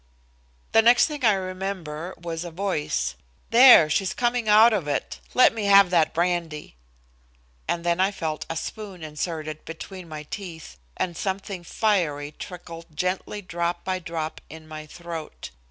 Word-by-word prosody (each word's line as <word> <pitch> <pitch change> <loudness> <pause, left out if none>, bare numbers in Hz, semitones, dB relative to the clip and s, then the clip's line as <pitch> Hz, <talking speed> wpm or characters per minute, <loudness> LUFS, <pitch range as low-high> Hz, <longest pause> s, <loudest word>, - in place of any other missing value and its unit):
The 225 - +6
next 240 +2 +6
thing 295 -3 -6
I 215 -3 +6
remember 185 -3 -4
was 165 0 -5
a 175 - -6
voice. 160 - -2 0.4
"There, 240 -8 +9
she's 185 +5 0
coming 240 -2 0
out 220 +2 +7
of 185 -8 -1
it. 145 - -2 0.2
Let 250 - +6
me 220 -2 -3
have 200 -2 +7
that 160 -3 +3
brandy," 170 - -2 0.9
and 170 - -1
then 170 0 +1
I 190 +1 +4
felt 160 -6 -4
a 165 - -3
spoon 195 -2 -6
inserted 155 0 -5
between 175 +2 -9
my 155 -1 -7
teeth 165 - -8 0.2
and 175 -2 -2
something 190 0 -4
fiery 165 -8 0
trickled 165 -1 -10
gently 185 +3 -2
drop 175 -1 -2
by 185 -1 -2
drop 165 -2 -5
in 160 0 -11
my 155 -1 -8
throat. 170 -1 -8
175 Hz, 155 wpm, -25 LUFS, 160-200 Hz, 0.9 s, There